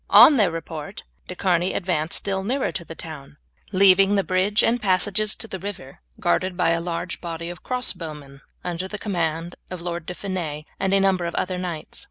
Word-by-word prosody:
On 295 - +9
their 205 -6 +4
report 165 +1 -6 0.2
De 180 - -6
Charny 180 -1 +1
advanced 170 -4 0
still 195 -1 -1
nearer 260 +7 0
to 170 - -4
the 165 - -9
town, 150 -4 -9 0.3
leaving 195 +1 +6
the 195 - +3
bridge 190 +4 +2
and 240 +1 +2
passages 205 +2 +1
to 225 - -6
the 190 - -6
river 180 -8 -7 0.2
guarded 180 - +1
by 180 -2 +3
a 165 0 +1
large 175 +1 -4
body 170 0 -4
of 175 - -11
crossbow 185 -11 -2
men 140 -2 -13 0.2
under 175 +1 -3
the 210 - -5
command 170 -4 -2
of 185 - -5
the 170 - -11
Lord 170 -2 -4
De 180 - -4
Fiennes 170 -7 -4 0.2
and 195 - +1
a - - +5
number 190 -2 +2
of 170 - -3
other 185 -1 -1
knights. 175 -4 -5
180 Hz, 205 wpm, -24 LUFS, 165-195 Hz, 0.3 s, On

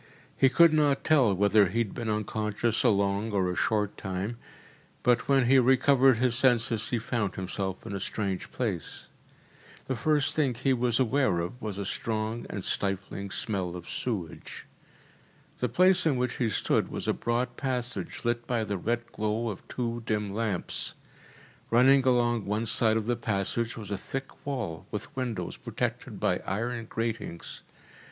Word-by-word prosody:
He 135 - +5
could 170 +3 +6
not 145 -2 +2
tell 140 -9 +4
whether 100 +1 +4
he 105 - -4
had 115 -4 0
been 120 -3 -4
unconscious 105 +1 -1
a 125 - +5
long 100 +1 +1
or 95 -2 +1
a - - -4
short 105 0 0
time, 95 +5 -3 0.7
but 125 -1 +3
when 135 -2 +4
he 135 +2 +6
recovered 130 0 +5
his 125 0 +2
senses 120 -3 +2
he 120 - 0
found 110 -4 -2
himself 95 +1 -4
in 110 - -5
a 100 - -2
strange 95 -1 -3
place. 100 - -3 0.8
The 130 - -2
first 145 +4 +2
thing 140 -6 +1
he 130 +3 +1
was 120 -1 +1
aware 130 -5 +2
of 90 +9 -5
was 105 -3 -4
a 100 - -3
strong 110 +3 -3
and 100 - -4
stifling 100 +1 -1
smell 95 -2 -1
of 85 -1 -8
sewage. 100 -10 -5 0.9
The 125 - 0
place 180 +7 +4
in 145 - +3
which 125 -1 -1
he 120 -3 +1
stood - - +1
was - - -4
a - - +3
broad 120 +1 -1
passage 125 -2 -3
lit 120 0 -1
by 120 -3 0
the 100 -3 -3
red 120 +4 -1
glow 110 +2 -1
of 100 - -6
two 120 -1 -3
dim 105 -2 -1
lamps. 105 -4 -1 0.7
Running 130 +3 +5
along 120 -3 +2
one 105 +3 -1
side 110 0 +3
of 110 - -2
the 120 +1 +1
passage 115 +1 -1
was 105 -3 -7
a 100 - -2
thick 135 +6 -7
wall 120 - -4
with - - -6
windows 125 -4 -3
protected - - -4
by - - +1
iron 115 +2 -2
gratings. 115 -7 -4
115 Hz, 170 wpm, -28 LUFS, 100-125 Hz, 0.9 s, could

